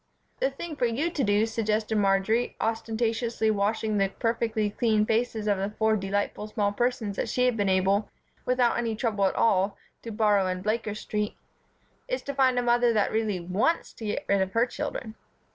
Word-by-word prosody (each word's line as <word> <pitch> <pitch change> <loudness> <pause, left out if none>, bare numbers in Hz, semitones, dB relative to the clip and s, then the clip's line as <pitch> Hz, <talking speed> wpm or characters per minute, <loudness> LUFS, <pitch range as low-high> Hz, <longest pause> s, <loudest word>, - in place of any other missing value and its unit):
"The - - +2
thing 340 -3 -7
for 245 - +2
you 280 +9 -1
to 295 -5 -1
do," 205 0 +3
suggested 220 -1 -1
Marjory, 205 +3 +2
ostentatiously 225 0 0
washing 215 +1 0
the 195 -1 +2
perfectly 225 -1 -1
clean 215 -1 +2
faces 225 -1 0
of 200 -2 +2
the 195 +1 -1
four 220 0 +3
delightful 205 +1 -2
small 210 -2 0
persons 225 -2 -1
that - - -2
she 250 - +1
had 250 -2 +2
been 205 -3 0
able, 195 +2 +2 0.3
without 250 -1 +2
any 230 -2 -1
trouble 210 -4 0
at 190 - 0
all, 195 -2 +2 0.2
to 230 - -7
borrow 210 -3 +2
in 185 0 -3
Blaker 215 0 -1
Street, 210 0 -3 0.7
"is - - -2
to 280 - -4
find 260 -2 +3
a 245 - +2
mother 240 0 +3
that 210 -2 +1
really 215 -4 0
wants 190 - 0
to 225 - -9
get 210 - -3
rid 200 -1 +2
of 190 0 -2
her 230 +1 +3
children." 250 -3 -5
220 Hz, 190 wpm, -27 LUFS, 205-235 Hz, 0.7 s, do